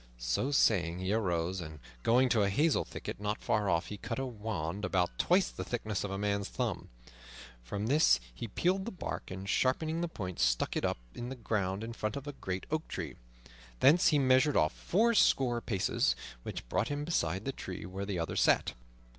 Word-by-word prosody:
So -, -, 0 dB
saying, 90 Hz, -11 st, +3 dB
he 95 Hz, +2 st, -1 dB
arose, 90 Hz, -4 st, 0 dB
and 80 Hz, -2 st, -8 dB, 0.2 s
going 125 Hz, -, +4 dB
to 115 Hz, -3 st, +3 dB
a 100 Hz, -, +3 dB
hazel 150 Hz, +10 st, +2 dB
thicket -, -, -7 dB
not 105 Hz, +1 st, -1 dB
far 105 Hz, -2 st, 0 dB
off, 85 Hz, -1 st, +2 dB
he 105 Hz, -, -5 dB
cut 115 Hz, +3 st, -4 dB
a 135 Hz, -, -1 dB
wand 105 Hz, -6 st, -4 dB
about 90 Hz, -2 st, +1 dB
twice 185 Hz, +1 st, +3 dB
the -, -, -5 dB
thickness 110 Hz, -4 st, -3 dB
of 100 Hz, -, -3 dB
a 95 Hz, -, -3 dB
man's 100 Hz, 0 st, -1 dB
thumb. -, -, -3 dB, 0.7 s
From 100 Hz, -, -3 dB
this 135 Hz, -, +5 dB
he 65 Hz, -, -6 dB
peeled 185 Hz, -, 0 dB
the 235 Hz, -, -4 dB
bark, 180 Hz, -, -5 dB
and, 95 Hz, +1 st, -6 dB
sharpening 155 Hz, +9 st, +1 dB
the 175 Hz, -, 0 dB
point, 95 Hz, -, -6 dB
stuck -, -, +2 dB
it -, -, -1 dB
up -, -, 0 dB, 0.2 s
in 120 Hz, +1 st, -5 dB
the 135 Hz, -, -5 dB
ground 105 Hz, -4 st, -1 dB
in 115 Hz, +1 st, -5 dB
front 110 Hz, -2 st, -3 dB
of 140 Hz, 0 st, -5 dB
a 145 Hz, -, -5 dB
great 95 Hz, -7 st, -4 dB
oak 155 Hz, 0 st, -1 dB
tree. -, -, -5 dB, 0.6 s
Thence 160 Hz, +6 st, +6 dB
he 150 Hz, -, +4 dB
measured 130 Hz, +2 st, +4 dB
off 75 Hz, -, +3 dB
fourscore 170 Hz, -, +3 dB
paces, 95 Hz, -, +1 dB, 0.3 s
which -, -, -6 dB
brought 110 Hz, -, 0 dB
him 145 Hz, +1 st, -3 dB
beside 95 Hz, -, -1 dB
the 135 Hz, -, 0 dB
tree 95 Hz, -8 st, -7 dB
where 95 Hz, +2 st, -5 dB
the 100 Hz, -3 st, -2 dB
other 85 Hz, -1 st, -2 dB
sat. -, -, +3 dB
105 Hz, 200 wpm, -32 LUFS, 95-135 Hz, 0.7 s, Thence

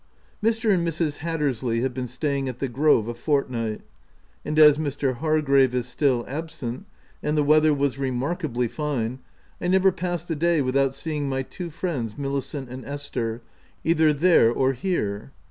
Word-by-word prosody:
Mr. 225 Hz, -1 st, +2 dB
and 170 Hz, -2 st, +1 dB
Mrs. 160 Hz, -2 st, -1 dB
Hattersley 135 Hz, -8 st, -1 dB
have 130 Hz, 0 st, -1 dB
been 125 Hz, 0 st, -4 dB
staying 135 Hz, +2 st, -2 dB
at 125 Hz, -, -6 dB
the 135 Hz, -, -2 dB
Grove 130 Hz, -3 st, +3 dB
a 120 Hz, -, -3 dB
fortnight; 120 Hz, -5 st, -1 dB, 0.6 s
and 150 Hz, +1 st, -3 dB
as 150 Hz, -1 st, +7 dB
Mr. 140 Hz, -4 st, -1 dB
Hargrave 140 Hz, -4 st, +3 dB
is 125 Hz, -1 st, -1 dB
still 125 Hz, -1 st, +1 dB
absent, 145 Hz, -, -5 dB, 0.3 s
and 150 Hz, +1 st, -1 dB
the 150 Hz, -, +3 dB
weather 155 Hz, +1 st, +5 dB
was 140 Hz, -2 st, 0 dB
remarkably 130 Hz, 0 st, -1 dB
fine, 130 Hz, -3 st, -3 dB, 0.4 s
I 175 Hz, -, -1 dB
never 190 Hz, +1 st, +4 dB
passed 175 Hz, -1 st, -3 dB
a -, -, 0 dB
day 170 Hz, +1 st, +2 dB
without 135 Hz, 0 st, +1 dB
seeing 145 Hz, -1 st, -3 dB
my 135 Hz, 0 st, -1 dB
two 175 Hz, +6 st, -7 dB
friends, 145 Hz, -, -3 dB
Milicent 140 Hz, 0 st, -3 dB
and 130 Hz, +1 st, -8 dB
Esther, 120 Hz, -5 st, -4 dB, 0.4 s
either 160 Hz, -2 st, +4 dB
there 150 Hz, -6 st, +4 dB
or 130 Hz, +2 st, +1 dB
here. 125 Hz, -, -2 dB
140 Hz, 160 wpm, -24 LUFS, 125-155 Hz, 0.6 s, as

